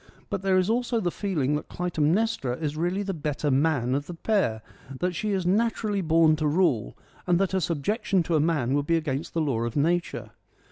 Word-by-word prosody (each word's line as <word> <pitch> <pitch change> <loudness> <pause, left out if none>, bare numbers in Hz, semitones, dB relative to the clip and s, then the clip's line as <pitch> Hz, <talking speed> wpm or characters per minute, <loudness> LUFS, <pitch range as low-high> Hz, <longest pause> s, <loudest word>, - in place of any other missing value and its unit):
But 200 -2 -2
there 190 -1 +2
is 185 0 +2
also 235 +1 0
the 175 -5 -1
feeling 160 -10 -1
that 150 - -5
Clytemnestra 170 - 0
is 150 -2 -3
really 175 +5 -1
the 195 -1 -3
better 150 -2 -2
man 135 -3 +1
of 145 +1 -2
the 175 - -6
pair: 165 - 0 0.4
that 180 0 0
she 210 +5 -2
is 190 -3 -1
natu 225 +6 +1
r 215 - -1
ally 200 -1 0
born 160 -2 +4
to 155 -1 0
rule, 145 - +1 0.3
and 175 -1 +4
that 195 0 +1
her 190 - +1
sub 165 -5 -2
jectionj 200 - +1
to 165 - 0
a - - +4
man 145 -5 +1
would 145 0 0
be 165 - +3
against 150 -1 -3
the 165 - +1
law 135 -7 0
of 115 0 -3
nature. 170 +4 0
165 Hz, 225 wpm, -26 LUFS, 145-190 Hz, 0.4 s, born